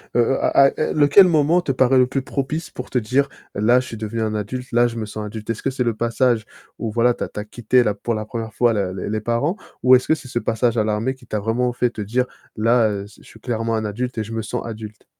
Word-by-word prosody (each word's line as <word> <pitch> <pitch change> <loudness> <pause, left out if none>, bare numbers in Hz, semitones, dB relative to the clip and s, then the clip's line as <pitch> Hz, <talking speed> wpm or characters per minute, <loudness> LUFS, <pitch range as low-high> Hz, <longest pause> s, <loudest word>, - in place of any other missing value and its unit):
heu - - +3
heu, - - 0
à - - +4 0.3
à 155 - -1
lequel 150 +6 +6
moment 165 +1 +3
te 135 - -1
paraît 130 0 +3
le 125 - +4
plus 135 +1 -2
propice 145 +5 -3
pour - - -7
te 125 - -1
dire, 130 +5 +1 0.3
là 120 +5 +4
je 130 - -4
suis 115 - -7
devenu 110 +1 -4
un 110 -1 -1
adulte, 125 +5 -5
là 120 +1 +4
je 120 - -6
me 110 - -3
sens 105 0 -6
adulte? 105 0 -8
Est-ce 115 - -5
que - - +1
c'est 130 -1 -1
le 115 -2 0
passage 120 0 +1 0.3
où, 110 -2 -3
voilà, 120 +2 +3
tu - - -5
as - - -3
tu - - -7
as 105 - -5
quitté 120 +3 +2
la 105 -3 +1
pour 115 +3 -3
la 105 0 -4
1re 115 -1 -5
fois 120 +1 +3
les 95 -3 -2
les 110 0 -2
parents 120 - 0 0.3
ou 130 +1 +8
est-ce 125 - +1
que 160 - +4
c'est 140 - -11
ce 120 - -2
passage 120 0 0
à 110 - +3
l'armée 110 +4 -1
qui 125 -2 -19
t'a 105 - -2
vraiment 115 +4 0
fait 120 0 +1
te 110 - -6
dire: 120 +5 0 0.3
«Là, 110 -3 +2
je 105 - -17
suis 110 - -16
clairement 115 -1 -2
un 110 - -2
adulte 120 +4 -4
et 110 - 0
je 110 +2 -8
me 115 - -2
sens 115 +3 -4
adulte»? 110 -2 -8
115 Hz, 275 wpm, -21 LUFS, 110-125 Hz, 0.3 s, ou